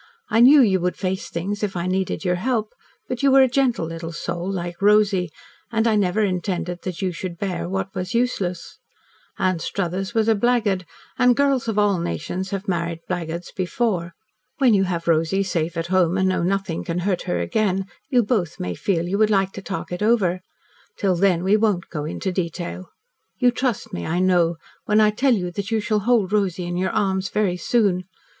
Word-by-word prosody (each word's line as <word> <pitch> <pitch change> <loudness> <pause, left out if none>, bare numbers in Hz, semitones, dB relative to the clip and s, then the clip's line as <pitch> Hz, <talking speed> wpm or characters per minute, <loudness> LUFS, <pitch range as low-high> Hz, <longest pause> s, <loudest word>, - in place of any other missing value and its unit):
I 225 - +3
knew 275 +4 +8
you 195 -6 +3
would 180 +1 -1
face 185 -1 -3
things, 195 +5 -3
if 205 -3 -2
I 170 - -2
needed 190 +2 -1
your 180 0 +1
help, 225 -3 -1 0.3
but 250 -2 -4
you 280 - +4
were 270 0 +7
a - - +4
gentle 250 -8 +1
little 165 0 -6
soul, 175 +2 -4
like 175 -1 -5
Rosy, 205 -3 +3 0.4
and 225 0 +1
I 220 - +3
never 205 +1 +1
intended 180 -2 -2
that 185 +1 -5
you 185 - 0
should 175 0 -6
bear 180 -2 -3
what 195 0 -3
was 185 +3 -4
useless. 195 -8 -2 0.6
Anstruthers 190 +2 -2
was 220 -1 +2
a 225 - +5
blackguard, 210 -5 +1 0.3
and 250 -1 +5
girls 275 -3 +1
of 220 -2 -1
all 205 -3 +3
nations 175 - -3
have 195 +1 -4
married 170 -2 -2
blackguards 170 -1 -4
before. 180 -3 -1 0.4
When 260 -5 +4
you 195 -1 +3
have 170 -2 -3
Rosy 165 +4 +2
safe 170 -3 -2
at 165 - -1
home, 180 -1 +3
and 190 0 +2
know 185 - 0
nothing 190 -2 -1
can 170 0 -3
hurt 185 -1 0
her 90 - 0
again, 190 - 0 0.2
you 245 -2 +3
both 200 -7 -1
may 90 0 -3
feel 170 - -1
you 200 +3 -1
would 215 -1 +4
like 195 -2 +2
to 195 - -8
talk 190 -1 -5
it 180 - -4
over. 200 -5 +2 0.6
Till 195 -3 +1
then 180 -1 +2
we 195 +3 +4
won't 210 -5 +1
go 150 -3 -4
into 185 +4 -3
detail. 175 0 -4 0.5
You 245 -1 +4
trust 245 -2 -2
me, 85 - -4
I 170 - -1
know, 175 -2 +3 0.3
when 210 +1 +3
I 215 -1 +5
tell 255 +4 +2
you 180 -3 -3
that 200 +3 -4
you 225 -1 +1
shall 215 0 0
hold 210 -3 +1
Rosy 190 -4 0
in 175 0 -3
your 185 +1 0
arms 190 -1 0
very 200 -4 0
soon. 185 -2 +1
190 Hz, 200 wpm, -22 LUFS, 175-215 Hz, 0.6 s, knew